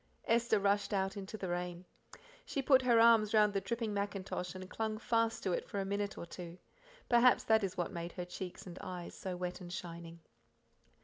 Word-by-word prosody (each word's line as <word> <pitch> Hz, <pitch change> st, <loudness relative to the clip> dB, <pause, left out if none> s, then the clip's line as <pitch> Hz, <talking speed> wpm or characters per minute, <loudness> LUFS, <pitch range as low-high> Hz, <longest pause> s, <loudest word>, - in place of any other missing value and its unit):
Esther 235 Hz, -1 st, +3 dB
rushed 200 Hz, +1 st, +1 dB
out 195 Hz, +1 st, 0 dB
into 200 Hz, +2 st, -6 dB
the 190 Hz, -, -4 dB
rain. 175 Hz, 0 st, -3 dB, 0.6 s
She 275 Hz, -, -3 dB
put 265 Hz, 0 st, +6 dB
her 240 Hz, -2 st, +4 dB
arms 225 Hz, -2 st, +6 dB
round 210 Hz, -1 st, +5 dB
the 195 Hz, -, 0 dB
dripping 230 Hz, -1 st, -2 dB
mackintosh 195 Hz, -3 st, -3 dB
and 185 Hz, 0 st, -7 dB
clung 220 Hz, +2 st, -2 dB
fast 230 Hz, 0 st, 0 dB
to 190 Hz, -, 0 dB
it -, -, -3 dB
for 200 Hz, -, -3 dB
a 195 Hz, -, -1 dB
minute 200 Hz, +1 st, -2 dB
or -, -, -5 dB
two. 170 Hz, 0 st, -9 dB, 0.5 s
Perhaps 240 Hz, +1 st, +5 dB
that 220 Hz, -1 st, +4 dB
is 190 Hz, -2 st, -3 dB
what 175 Hz, -, -1 dB
made 170 Hz, -2 st, -5 dB
her 180 Hz, -, -4 dB
cheeks 180 Hz, 0 st, -7 dB
and 180 Hz, -1 st, -9 dB
eyes 180 Hz, -3 st, -6 dB
so 185 Hz, -2 st, -5 dB
wet 180 Hz, +1 st, -4 dB
and 175 Hz, -1 st, -8 dB
shining. 170 Hz, -2 st, -7 dB
195 Hz, 200 wpm, -34 LUFS, 180-220 Hz, 0.6 s, put